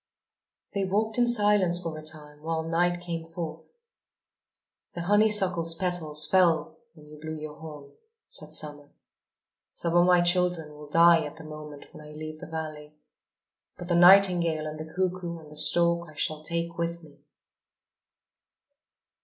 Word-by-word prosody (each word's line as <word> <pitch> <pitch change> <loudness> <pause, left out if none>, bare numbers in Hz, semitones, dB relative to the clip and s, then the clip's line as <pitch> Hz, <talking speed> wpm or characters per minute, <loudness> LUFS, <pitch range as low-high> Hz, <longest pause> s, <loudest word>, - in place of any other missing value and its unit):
They 200 -1 -1
walked 215 +4 -1
in 240 - +3
silence 205 -6 +3
for 165 -3 -5
a 155 - -8
time, 150 -1 -6
while 160 0 -2
night 175 +2 0
came 170 -2 -5
forth. 165 -1 -8 1.2
"The 170 - -4
honeysuckle's 190 -4 +2
petals 165 -4 -1
fell 180 -1 +2 0.2
when 150 -2 -17
you 150 0 -13
blew 155 +1 -6
your 150 -1 -8
horn," 150 -3 -11 0.4
said - - -3
Summer. 145 -1 -4 0.9
"Some 170 0 -2
of 175 +1 +5
my 180 -1 +5
children 175 -3 +1
will 150 0 -12
die 165 +1 +5
at 150 - -7
the 160 - -11
moment 150 -1 -10
when - - -13
I 150 0 -12
leave 155 0 -8
the - - -9
valley. 155 -2 -7 0.8
But 175 - -8
the 175 - +2
nightingale 175 -3 +5
and 155 0 -6
the 155 0 -8
cuckoo 180 -1 -3
and 155 -2 -14
the - - -12
stork 170 +2 +2
I 155 - -15
shall 155 0 -1
take 170 +1 -4
with 170 0 -3
me." 150 -2 -17
165 Hz, 155 wpm, -27 LUFS, 155-175 Hz, 1.2 s, of